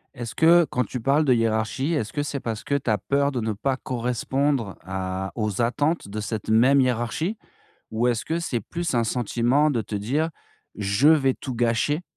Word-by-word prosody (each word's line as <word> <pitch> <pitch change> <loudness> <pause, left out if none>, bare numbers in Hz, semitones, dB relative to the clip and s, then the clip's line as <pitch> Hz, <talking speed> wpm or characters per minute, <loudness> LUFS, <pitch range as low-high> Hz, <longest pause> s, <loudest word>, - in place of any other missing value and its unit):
Est-ce 120 -3 -6
que, 170 +4 +5
quand 125 - 0
tu 125 +4 -5
parles 140 +6 +2
de 130 -4 +4
hiérarchie, 115 +6 0
est-ce 115 -8 -1
que 145 - -1
c'est 145 -1 -3
parce 110 -3 -4
que 140 - -1
tu 135 -4 -2
as 105 - +3
peur 140 +7 0
de 125 - -2
ne 110 -1 -1
pas 130 +6 -1
correspondre 125 -1 -1
à 95 0 -4
aux 105 -1 -1
attentes 145 +7 0
de 105 +2 -5
cette 110 0 -4
même 130 +5 +5
hiérarchie? 130 - -1 0.5
Ou 115 +2 0
est-ce 120 -2 0
que 165 - -1
c'est 140 -8 -2
plus 170 - -4
un 120 -1 +2
sentiment 120 +5 +1
de 120 -5 0
te 105 0 -6
dire: 135 +11 0 0.5
«je 105 +7 +2
vais 135 -5 +4
tout 130 - -6
gâcher?» 120 +7 +1
125 Hz, 195 wpm, -24 LUFS, 110-140 Hz, 0.5 s, que